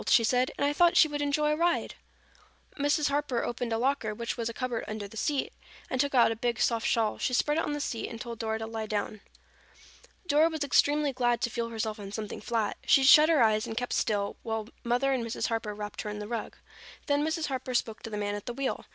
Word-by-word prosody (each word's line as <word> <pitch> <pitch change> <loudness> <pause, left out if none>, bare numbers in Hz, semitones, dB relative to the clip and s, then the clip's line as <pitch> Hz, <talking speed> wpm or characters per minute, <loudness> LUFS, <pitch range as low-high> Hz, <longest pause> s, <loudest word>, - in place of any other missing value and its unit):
she 240 -1 +6
said. 250 +3 +2
"And - - +1
I 290 - +1
thought 345 +3 +4
she 315 - +7
would 295 -1 -4
enjoy 300 +1 +1
a - - +2
ride." 340 +2 0 0.8
Mrs. 290 +1 +1
Harper 280 -4 -1
opened 240 0 -3
a 225 - +1
locker, 240 -3 0
which 235 +2 -3
was 230 -1 -2
a - - -6
cupboard 245 -1 -3
under 215 -1 -5
the 205 - -14
seat, 280 +5 -1 0.4
and 260 - +2
took 280 -1 -1
out 235 -2 +5
a - - -2
big 235 0 -2
soft 230 -1 +1
shawl. 220 -2 +1
She 250 - 0
spread 295 +5 +2
it - - 0
on 295 - -2
the 295 - -3
seat 235 -5 -3
and 230 - -8
told 235 -1 -7
Dora 220 -1 -1
to 225 - -5
lie 220 -1 -5
down. 210 0 -3 1.0
Dora 315 0 +4
was 315 -3 -3
extremely 290 +1 +2
glad 240 -2 +1
to 240 - 0
feel 235 0 -2
herself 220 -1 -3
on 200 -1 -7
something 210 0 -5
flat. 225 -2 -1
She 270 - +5
shut 300 +3 +8
her 310 -7 +5
eyes 215 +1 +2
and 225 -1 -6
kept 245 0 -2
still 205 -2 0
while 220 -1 -4
Mother 245 +3 +1
and 255 -3 -1
Mrs. 230 0 -2
Harper 225 -2 -2
wrapped 210 0 -6
her 210 - -5
in 210 - -5
the 210 0 -6
rug. 230 -1 -4 0.5
Then 290 0 +1
Mrs. 320 +1 -1
Harper 260 -2 -4
spoke 225 -2 -1
to - - -7
the 210 - -4
man 205 0 -2
at 205 -1 -6
the 240 - -3
wheel. 275 0 -3
240 Hz, 245 wpm, -29 LUFS, 220-285 Hz, 1.0 s, shut